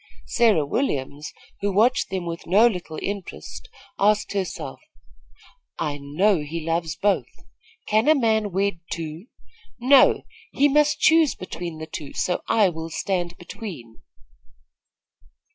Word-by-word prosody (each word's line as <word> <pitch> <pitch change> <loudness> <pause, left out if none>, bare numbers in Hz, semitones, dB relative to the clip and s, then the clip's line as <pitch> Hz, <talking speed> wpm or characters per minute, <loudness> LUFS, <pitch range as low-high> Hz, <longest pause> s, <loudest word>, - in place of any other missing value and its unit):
Sarah 215 -11 +3
Williams, 145 - -2 0.3
who 200 0 -1
watched 230 +6 +2
them 190 -2 -3
with 170 0 -6
no 205 +6 +5
little 180 -8 -1
interest, 200 - -6 0.3
asked 210 +1 +2
herself: 195 -3 -4 1.0
"I 150 -3 -3
know 175 +7 +2
he 155 +2 -5
loves 165 -1 -1
both. 205 -1 +1 0.6
Can 215 +4 +2
a 310 - +6
man 220 -5 +1
wed 195 -1 0
two? 165 +4 -5 0.5
No; 260 +2 +5 0.3
he 285 - +4
must 300 +1 +2
choose 320 -3 +5
between 175 -3 -6
the 160 - -6
two, 155 -3 -8
so 180 - -1
I 215 -3 +4
will 160 -2 -5
stand 175 0 -2
between." 170 - -9
185 Hz, 125 wpm, -23 LUFS, 160-220 Hz, 1.0 s, a